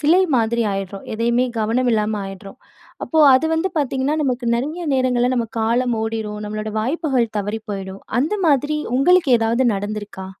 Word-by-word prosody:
சிலை 335 Hz, +6 st, +4 dB
மாதிரி 235 Hz, 0 st, +1 dB
ஆயிடுறோம். 195 Hz, 0 st, -5 dB
எதையுமே 235 Hz, +3 st, +1 dB
கவனம் 240 Hz, +4 st, +1 dB
இல்லாம 215 Hz, 0 st, 0 dB
ஆயிடுறோம். 195 Hz, +4 st, -10 dB, 0.5 s
அப்போ 320 Hz, -, -1 dB, 0.2 s
அது 260 Hz, +5 st, +3 dB
வந்து 325 Hz, +4 st, 0 dB
பார்த்தீங்கன்னா, 275 Hz, +1 st, 0 dB
நமக்கு 250 Hz, -2 st, -1 dB
நெறைய 310 Hz, +8 st, -3 dB
நேரங்கள்ல 250 Hz, -1 st, +1 dB
நம்ம 230 Hz, -2 st, -1 dB
காலம் 235 Hz, +2 st, +1 dB
ஓடிரும், 220 Hz, -2 st, -4 dB
நம்மளோட 215 Hz, +1 st, -4 dB
வாய்ப்புகள் 260 Hz, -3 st, -1 dB
தவறி 205 Hz, +2 st, -3 dB
போயிடும். 195 Hz, -1 st, -6 dB, 0.2 s
அந்த 305 Hz, +10 st, 0 dB
மாதிரி 295 Hz, +1 st, +2 dB, 0.2 s
உங்களுக்கு 350 Hz, +1 st, +4 dB
ஏதாவது 230 Hz, +3 st, +1 dB
நடந்துருக்கா? 205 Hz, -1 st, -5 dB
235 Hz, 150 wpm, -20 LUFS, 215-270 Hz, 0.5 s, சிலை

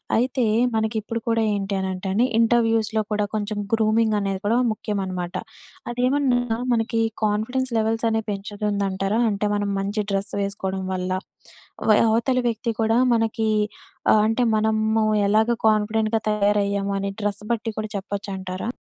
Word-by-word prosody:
అయితే 250 Hz, +2 st, +1 dB, 0.3 s
మనకిప్పుడు 220 Hz, +1 st, -1 dB
కూడా 230 Hz, -1 st, +2 dB
ఏంటి 200 Hz, -1 st, -2 dB
అనంటే 190 Hz, 0 st, -3 dB
అండి 230 Hz, +5 st, +3 dB
ఇంటర్వ్యూస్‌లో 225 Hz, -2 st, +2 dB
కూడా 210 Hz, 0 st, +1 dB
కొంచెం 210 Hz, 0 st, -2 dB, 0.2 s
గ్రూమింగ్ 220 Hz, 0 st, +3 dB
అనేది 195 Hz, -1 st, -2 dB
కూడా 230 Hz, +3 st, +3 dB
ముఖ్యం 210 Hz, -1 st, -3 dB
అనమాట. 180 Hz, -1 st, -4 dB, 0.6 s
అదేమన్నా 245 Hz, -2 st, +1 dB, 0.2 s
మనకి 225 Hz, 0 st, 0 dB, 0.2 s
కాన్ఫిడెన్స్ 240 Hz, +5 st, 0 dB
లెవెల్స్ 225 Hz, +1 st, 0 dB
అనేవి 220 Hz, 0 st, -1 dB
పెంచుతుందంటారా? 200 Hz, 0 st, -1 dB
అంటే 205 Hz, 0 st, -1 dB
మనం 205 Hz, -1 st, -1 dB
మంచి 205 Hz, +2 st, -1 dB
డ్రెస్ 195 Hz, 0 st, -2 dB
వేసుకోవడం 190 Hz, -1 st, -3 dB
వల్ల 185 Hz, 0 st, -2 dB, 0.8 s
వె 210 Hz, -, +6 dB
అవతలి 245 Hz, +3 st, +1 dB
వ్యక్తి 230 Hz, +1 st, -2 dB
కూడా 225 Hz, +1 st, +2 dB, 0.2 s
మనకి 225 Hz, 0 st, 0 dB, 0.7 s
ఆహ్ 215 Hz, -, +5 dB
అంటే 225 Hz, +3 st, +1 dB
మనము 220 Hz, 0 st, +1 dB, 0.2 s
ఎలాగా 220 Hz, +3 st, +3 dB
కాన్ఫిడెంట్‌గా 215 Hz, +1 st, +2 dB
తయారయ్యాము 200 Hz, -1 st, +1 dB
అని 200 Hz, 0 st, -2 dB
డ్రెస్ 205 Hz, 0 st, -2 dB
బట్టి 225 Hz, -1 st, -1 dB
కూడా 215 Hz, -1 st, -4 dB
చెప్పొచ్చంటారా? 195 Hz, +1 st, -4 dB
215 Hz, 135 wpm, -23 LUFS, 200-225 Hz, 0.8 s, వె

